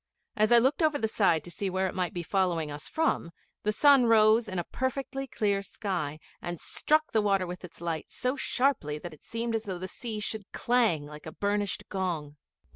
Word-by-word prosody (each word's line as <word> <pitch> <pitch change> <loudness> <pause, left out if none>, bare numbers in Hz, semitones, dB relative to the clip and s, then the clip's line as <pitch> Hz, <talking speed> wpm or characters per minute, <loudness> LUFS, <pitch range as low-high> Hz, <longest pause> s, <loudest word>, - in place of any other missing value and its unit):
As 215 +1 +3
I 240 - +9
looked 265 +8 +3
over 310 -2 +3
the 220 - 0
side 195 -7 +2
to 175 - -9
see 195 +4 -2
where 185 +1 0
it 190 - -2
might 180 -2 -1
be 175 - -4
following 170 -5 0
us 145 +1 -7
from, 320 - 0 0.3
the 210 - +1
sun 275 +2 +6
rose 220 0 +5
in 185 - -4
a 175 - 0
perfectly 270 +4 -3
clear 200 -5 0
sky 185 -7 -3 0.2
and 175 -1 -4
struck 310 0 +1
the 220 - +3
water 195 -2 +2
with 180 +1 -7
its 170 -1 -11
light 165 -2 -3
so 250 +2 -1
sharply 250 - 0
that 170 +2 -8
it 155 - -17
seemed 230 0 -3
as 225 0 -1
though 190 -3 -3
the 185 +1 -5
sea 220 +1 -5
should 210 -1 -4
clang 230 -12 +2
like 150 +1 -10
a - - -5
burnished 205 +2 -1
gong. 165 -7 -3
200 Hz, 210 wpm, -29 LUFS, 175-230 Hz, 0.3 s, I